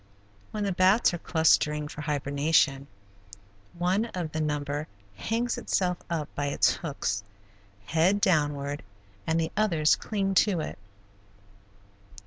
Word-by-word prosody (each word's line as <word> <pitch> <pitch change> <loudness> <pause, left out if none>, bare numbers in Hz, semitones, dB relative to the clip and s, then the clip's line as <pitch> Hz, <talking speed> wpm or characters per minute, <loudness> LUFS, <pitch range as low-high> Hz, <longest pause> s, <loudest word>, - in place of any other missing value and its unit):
When 210 -1 -3
the 200 - 0
bats 185 +4 +4
are 175 - -3
clustering 150 -3 +2
for 150 - -8
hibernation 145 -1 +1 0.9
one 185 +5 +1
of 180 -8 -5
the 155 - -2
number 145 0 -2 0.3
hangs 230 - -1
itself 180 -2 0
up 160 -4 -2
by 145 0 -2
its 140 - +3
hooks, 100 - -3 0.6
head 170 - +2
downward, 145 -5 +1 0.5
and 160 +1 +2
the 160 0 -1
others 170 -8 +3
cling 195 -2 -2
to 190 -2 +3
it. 155 - -5
160 Hz, 120 wpm, -27 LUFS, 145-185 Hz, 0.9 s, bats